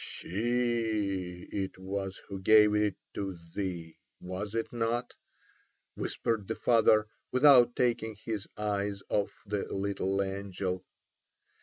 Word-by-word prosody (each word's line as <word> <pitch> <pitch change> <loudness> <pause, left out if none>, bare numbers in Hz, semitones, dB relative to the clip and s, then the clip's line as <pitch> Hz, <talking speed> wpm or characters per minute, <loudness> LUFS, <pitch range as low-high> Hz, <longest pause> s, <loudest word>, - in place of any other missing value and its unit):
"She 110 -5 -1
it 95 -1 -3
was 95 0 -4
who 100 -1 -5
gave 105 +1 +6
it 105 -2 +2 0.2
to 95 -3 -4 0.2
thee, 85 -5 -4 0.2
was 95 +4 -5
it 115 +1 -2
not?" 120 +1 -1 0.8
whispered 110 -4 -2
the 110 - -2
father, 110 -2 +4 0.3
without 130 -2 +7
taking 115 -3 +1
his 105 -1 -4
eyes 100 -1 -1
off 105 -1 +1
the 100 -1 -3
little 95 0 -1
angel. 95 -1 -4
105 Hz, 115 wpm, -30 LUFS, 95-115 Hz, 0.8 s, without